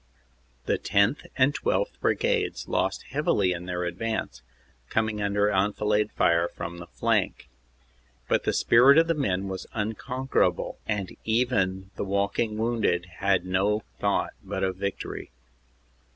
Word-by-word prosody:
The - - 0
10th. 100 +8 +1
and 135 +2 +4
12th. - - -1
Brigades 475 -3 0
lost - - 0
heavily 105 -10 +2
in 90 0 -4
their 90 -1 -2
advance, 90 - -3 0.5
coming 110 -1 0
under 100 +1 +2
enfilade 105 +2 +1
fire 85 0 +3
from 85 0 -7
the 85 - -9
flank. - - 0 0.8
But - - +2
the - - +1
spirit 130 +5 +6
of 165 - +6
the 165 - +1
men 100 - -1
was 95 -1 -5
unconquerable, 125 +5 -1
and 100 -4 -2
even 100 -5 0
the - - -1
walking 100 +3 0
wounded 110 -6 +1
had 95 -3 +2
no 100 +4 +1 0.2
thought - - 0
but - - -3
of 95 -1 -1
victory. 100 0 -4
105 Hz, 135 wpm, -26 LUFS, 95-115 Hz, 0.8 s, spirit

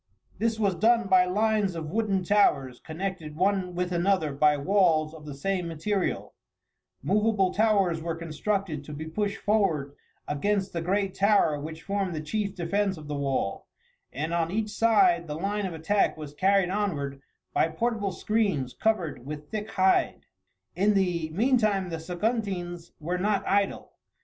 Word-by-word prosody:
This 225 0 0
was 200 -3 +2
done 230 +3 +3
by 185 -1 +5
lines 205 0 +1
of 155 -2 -5
wooden 205 -3 0
towers, 140 -10 +2
connected 165 -2 -5
one 185 0 0
with 180 0 -1
another 175 -4 +1
by 150 +1 +3
walls 160 -2 +2
of 155 -2 -11
the 145 - -6
same 180 +4 -2
material; 180 +4 -2 0.7
movable 210 -2 +2
towers 200 -6 +2
were 165 0 -3
constructed 165 0 -2
to 150 - -8
be 155 +2 -6
pushed 200 +5 -2
forward 175 -10 +1 0.3
against 195 +6 -1
the 170 - -2
great 195 +2 0
tower 200 -7 +3
which 160 +2 -7
formed 195 -3 -2
the - - -2
chief 200 +6 -3
defence 195 +2 0
of 150 -1 -10
the 150 - -4
wall, 135 -8 -2 0.4
and 155 +5 -3
on 165 -1 +1
each 215 +3 -2
side 230 - +3
the 150 - -4
line 200 +3 -1
of 180 - -6
attack 180 +5 +1
was 150 -2 -8
carried 190 +2 +2
onward 145 -10 -2 0.3
by - - +3
portable 205 +4 -1
screens 190 - 0
covered 180 - -1
with 150 +2 -8
thick 215 -1 -4
hide. 190 0 +2 0.5
In 205 +3 +3
the 175 -4 +1
meantime 210 -1 +2
the 165 -1 -4
Saguntines 175 -1 -3
were 175 +4 -2
not 205 +1 0
idle. 200 0 0
185 Hz, 160 wpm, -27 LUFS, 160-205 Hz, 0.7 s, by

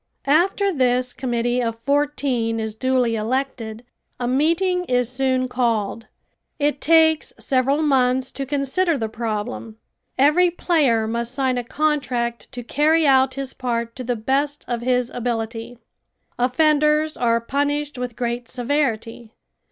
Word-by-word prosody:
After 370 +7 +2
this 250 -3 +1
committee 245 -1 -1
of 230 -1 -2
fourteen 265 -3 0
is 220 -1 -3
duly 250 0 +1
elected 230 0 -3 0.3
a 245 - -1
meeting 335 +7 +1
is 250 -4 0
soon 260 0 0
called. 230 -3 -1 0.5
It 290 -1 0
takes 320 -1 +4
several 275 +3 +1
months 260 -2 +2
to 275 -1 -5
consider 290 +5 0
the 225 -3 -2
problem. 210 - -4 0.4
Every 300 +7 +4
player 295 -10 +1
must 235 +2 -3
sign 260 -2 0
a - - -4
contract 255 -4 -1
to 245 -1 -7
carry 310 +6 +2
out 265 -1 +4
his 275 -1 -5
part 235 -2 -3
to 255 - -6
the 245 0 -1
best 275 +6 -1
of 240 -1 -2
his 250 0 0
ability. 230 0 -4 0.6
Offenders 300 +4 +2
are 230 -1 +2
punished 285 +3 -2
with 250 -2 -4
great 240 -1 -3
severity. 235 -4 -2
255 Hz, 135 wpm, -22 LUFS, 235-290 Hz, 0.6 s, takes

